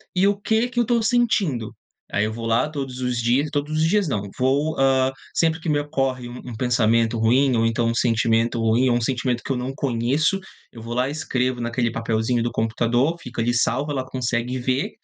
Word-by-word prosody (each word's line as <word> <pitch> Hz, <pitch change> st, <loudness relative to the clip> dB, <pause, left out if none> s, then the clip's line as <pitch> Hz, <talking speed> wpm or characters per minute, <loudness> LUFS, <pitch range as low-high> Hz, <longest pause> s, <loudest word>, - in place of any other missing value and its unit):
e 185 Hz, +2 st, +4 dB
“O 200 Hz, -, +2 dB
que 220 Hz, +3 st, +1 dB
que 245 Hz, -1 st, -2 dB
eu -, -, +4 dB
estou 235 Hz, 0 st, +1 dB
sentindo?”. 210 Hz, -, +1 dB, 0.4 s
Aí 105 Hz, +1 st, +1 dB
eu 110 Hz, -, -3 dB
vou 115 Hz, 0 st, -5 dB
lá 115 Hz, +5 st, +2 dB
todos 135 Hz, -4 st, -5 dB
os 125 Hz, -1 st, -1 dB
dias 125 Hz, +6 st, +2 dB
todos 145 Hz, 0 st, -2 dB
os 160 Hz, -, +3 dB
dias 205 Hz, +1 st, +2 dB
não, 105 Hz, -8 st, -1 dB, 0.2 s
vou, 140 Hz, +5 st, +1 dB
hã, 135 Hz, -1 st, +3 dB, 0.2 s
sempre 160 Hz, 0 st, +1 dB
que 160 Hz, -, -4 dB
me 150 Hz, -, +2 dB
ocorre 135 Hz, -4 st, -2 dB
um 120 Hz, 0 st, -8 dB
pensamento 115 Hz, -1 st, +2 dB
ruim 125 Hz, +4 st, +3 dB
ou 115 Hz, 0 st, +2 dB
então 115 Hz, +1 st, 0 dB
um 115 Hz, -, +1 dB
sentimento 115 Hz, 0 st, +1 dB
ruim 115 Hz, +3 st, +2 dB
ou 120 Hz, -, +3 dB
um -, -, -2 dB
sentimento 125 Hz, 0 st, -1 dB
que -, -, -4 dB
eu -, -, +1 dB
não 125 Hz, +2 st, -3 dB
conheço, 135 Hz, +9 st, 0 dB, 0.3 s
eu 115 Hz, -, -11 dB
vou 115 Hz, +1 st, -5 dB
lá 125 Hz, +1 st, +1 dB
e -, -, -3 dB
escrevo 130 Hz, -5 st, -1 dB
naquele 120 Hz, 0 st, -1 dB
papelzinho 115 Hz, +1 st, 0 dB
do 120 Hz, +1 st, -1 dB
computador, 120 Hz, +6 st, +1 dB
fica 125 Hz, -1 st, -5 dB
ali 120 Hz, +1 st, +1 dB
salvo, 135 Hz, +4 st, 0 dB
ela 135 Hz, -2 st, -1 dB
consegue 125 Hz, -1 st, -2 dB
ver, 130 Hz, +2 st, -1 dB
125 Hz, 215 wpm, -22 LUFS, 115-145 Hz, 0.4 s, e